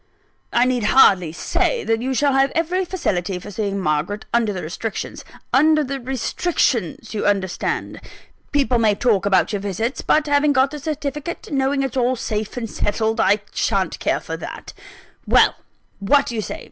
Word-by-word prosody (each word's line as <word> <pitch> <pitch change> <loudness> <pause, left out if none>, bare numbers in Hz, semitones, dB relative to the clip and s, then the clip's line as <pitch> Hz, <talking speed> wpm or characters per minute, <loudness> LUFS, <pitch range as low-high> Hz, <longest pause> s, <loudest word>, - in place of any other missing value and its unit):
I 240 - +3
need 250 -3 0
hardly 195 -8 +5
say 465 - -1
that 225 0 0
you 260 +1 -1
shall 285 +1 +2
have 270 +1 +3
every 355 +3 0
facility 195 - -2
for 195 +3 -9
seeing 200 -1 -2
Margaret, 165 +5 -1
under 235 -3 +2
the 185 -3 -5
restrictions 195 +7 -5 0.3
under 305 +2 +4
the 275 0 -4
restrictions, 250 - -1
you 210 - -1
understand. 195 -3 -1 0.5
People 270 -4 +2
may 215 -2 +3
talk 205 -3 +1
about 195 +2 +2
your 205 - -1
visits; 220 +6 -2
but 305 0 +2
having 290 0 +3
got 265 0 +3
the 300 - -6
certificate, 295 +2 -4
and 280 - 0
knowing 275 +1 +1
it's 270 0 -3
all 250 +1 +2
safe 215 -1 -4
and 235 -2 -3
settled, 220 +2 -1
I 205 -1 +3
shan't - - 0
care - - 0
for - - -6
that. - - -8 0.5
Well, - - +5 0.5
what 275 +8 +3
do - - -5
you 220 - -1
say? - - -6
240 Hz, 175 wpm, -21 LUFS, 205-280 Hz, 0.5 s, hardly